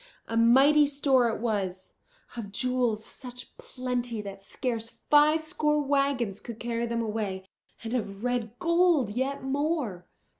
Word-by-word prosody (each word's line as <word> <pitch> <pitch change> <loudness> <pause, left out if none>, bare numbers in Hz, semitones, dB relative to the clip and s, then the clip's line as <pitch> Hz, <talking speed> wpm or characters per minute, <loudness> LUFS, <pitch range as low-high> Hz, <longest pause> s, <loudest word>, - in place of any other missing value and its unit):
A 225 - -4
mighty 270 +6 +6
store 275 -4 +3
it 225 - -3
was, 195 -5 -2 0.4
of 215 -4 -6
jewels 245 -1 0
such 250 -1 -10
plenty 245 -3 -3
that 195 -1 -8
scarce 230 +2 -3 0.2
five 305 +2 +5
score 300 -1 +1
wagons 275 -7 0
could 235 -2 -9
carry 235 0 -2
them 235 0 -1
away, 210 -4 -3 0.4
and 225 +1 -4
of 205 -4 -3
red 245 -2 -2
gold 335 - +3
yet 265 +5 -2
more. 270 - -2
245 Hz, 140 wpm, -28 LUFS, 220-280 Hz, 0.4 s, mighty